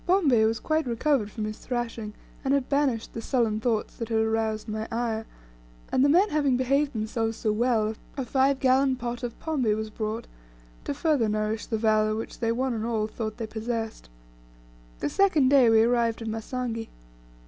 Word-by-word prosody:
Bombay 295 - +4
was 225 0 +1
quite 310 +1 0
recovered 240 -2 +1
from 215 0 -4
his 215 0 -5
thrashing, 230 -3 -4 0.3
and 275 0 +2
had 270 -2 0
banished 275 -6 0
the 230 - -5
sullen 225 -3 +1
thoughts 225 -2 -1
that 230 -1 -5
had 225 - +1
aroused 220 0 0
my 215 +1 -3
ire, 225 -1 -2 0.6
and 260 - +3
the 285 - +5
men 370 +8 +5
having 285 -4 +2
behaved 275 +3 +1
themselves 225 0 -2
so 220 - 0
well, 220 -1 +1 0.2
a 265 - -2
five 265 +2 +2
gallon 265 0 +3
pot 240 -1 -4
of 240 -2 -5
pombe 280 -9 0
was 220 0 -4
brought 220 +2 -3 0.6
to 285 - -2
further 290 -7 +2
nourish 215 +1 -1
the 225 - -1
valour, 215 -1 +2
which 225 - -6
they 230 -1 +1
one 255 +2 0
and 220 -1 -3
all 225 -2 0
thought 215 0 -5
they 230 - -3
possessed. 225 - -4 0.9
The - - 0
second 325 - +3
day 265 -4 +6
we 225 0 +6
arrived 235 -1 +1
at - - -5
Masangi. 225 +1 -4
230 Hz, 185 wpm, -26 LUFS, 220-260 Hz, 0.9 s, day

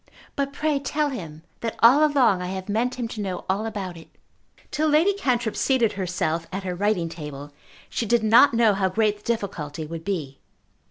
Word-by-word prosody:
"But 280 0 -1
pray 300 0 0
tell 290 +2 -1
him 165 - -7 0.2
that 230 -1 -3
all 255 +6 +6
along 260 -11 +3
I 180 - -3
have 190 0 -5
meant 230 +5 0
him 240 -2 -3
to 215 - -5
know 190 -3 -4
all 200 +4 0
about 195 -5 -5
it." 165 - -13 0.6
Till 310 +1 0
Lady 315 +7 +4
Cantrip 245 - -1
seated 245 -5 +2
herself 170 -3 -2
at 195 +1 -4
her 185 -1 -3
writing 190 -2 0
table 150 -3 -8 0.3
she 230 - -3
did 235 +1 +2
not 230 +4 +6
know 230 -2 +4
how 195 -1 +1
great 210 +1 +1
the 205 - -24
difficulty 165 -9 -3
would 165 +1 -7
be. 155 -9 -4
210 Hz, 195 wpm, -24 LUFS, 180-245 Hz, 0.6 s, all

